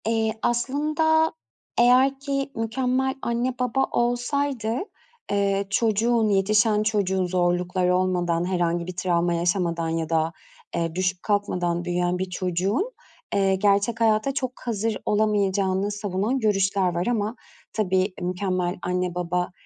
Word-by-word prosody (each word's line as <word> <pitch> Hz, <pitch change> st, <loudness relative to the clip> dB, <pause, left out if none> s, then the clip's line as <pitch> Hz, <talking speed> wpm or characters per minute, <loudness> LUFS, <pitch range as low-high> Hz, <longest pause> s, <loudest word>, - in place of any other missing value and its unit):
Eee, 225 Hz, -1 st, +1 dB
aslında 305 Hz, +6 st, +1 dB, 0.5 s
eğer 255 Hz, +3 st, +5 dB
ki 275 Hz, 0 st, -2 dB
mükemmel 255 Hz, +3 st, 0 dB
anne 240 Hz, +2 st, -1 dB
baba 250 Hz, +1 st, +1 dB
olsaydı, 245 Hz, -1 st, 0 dB, 0.5 s
eee, 200 Hz, -1 st, +1 dB
çocuğun, 225 Hz, +2 st, +2 dB
yetişen 210 Hz, +2 st, +3 dB
çocuğun, 195 Hz, -3 st, +1 dB
zorlukları 180 Hz, 0 st, +1 dB
olmadan, 175 Hz, -2 st, +1 dB
herhangi 175 Hz, -2 st, 0 dB
bir 185 Hz, -, -6 dB
travma 175 Hz, -1 st, +1 dB
yaşamadan 170 Hz, -1 st, 0 dB
ya 165 Hz, -1 st, -2 dB
da, 160 Hz, 0 st, +1 dB, 0.4 s
eee, 165 Hz, -1 st, -1 dB
düşüp 185 Hz, 0 st, -1 dB
kalkmadan 180 Hz, -4 st, 0 dB
büyüyen 180 Hz, 0 st, 0 dB
bir 185 Hz, 0 st, -2 dB
çocuğun, 185 Hz, -, -1 dB, 0.4 s
eee, 195 Hz, -1 st, +3 dB
gerçek 205 Hz, +3 st, +1 dB
hayata 220 Hz, +4 st, +2 dB
çok 255 Hz, -2 st, -2 dB
hazır 225 Hz, -1 st, -1 dB
olamayacağını 200 Hz, -2 st, +1 dB
savunan 205 Hz, +4 st, -1 dB
görüşler 195 Hz, -4 st, +1 dB
var 175 Hz, +5 st, -1 dB
ama 220 Hz, -1 st, 0 dB, 0.4 s
tabii 190 Hz, -2 st, +1 dB
mükemmel 180 Hz, 0 st, -1 dB
anne 180 Hz, 0 st, -1 dB
baba, 180 Hz, 0 st, -1 dB
200 Hz, 120 wpm, -24 LUFS, 180-230 Hz, 0.5 s, eğer